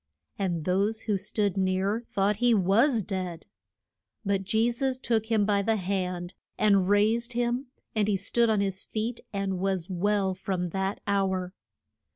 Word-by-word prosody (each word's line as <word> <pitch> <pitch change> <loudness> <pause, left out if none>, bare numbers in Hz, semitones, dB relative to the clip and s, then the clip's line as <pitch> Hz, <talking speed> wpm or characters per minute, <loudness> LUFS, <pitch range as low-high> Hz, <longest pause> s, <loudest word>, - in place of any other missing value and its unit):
And 175 -5 -1
those 200 +4 +1
who 210 - 0
stood 200 0 -1
near 190 +3 +1
thought 200 +1 +1
he 240 0 +4
was 215 +5 +3
dead. 185 -3 -4 0.8
But 195 -1 +1
Je 220 +4 +2
sus 260 +2 -1
took 230 -4 0
him 220 -3 +2
by 200 -1 +2
the 220 +2 +1
hand 180 -2 -2 0.2
and 200 -3 +3
raised 225 +4 +2
him, 245 +3 -1 0.3
and 210 -2 +2
he 205 -2 +2
stood 230 +4 +2
on 215 -2 +2
his 195 -1 -2
feet 225 +2 -3
and 195 -2 -2
was 190 -1 -1
well 195 +1 +1
from 185 -1 -3
that 190 +3 -2
hour. 190 -2 0
200 Hz, 160 wpm, -27 LUFS, 190-220 Hz, 0.8 s, he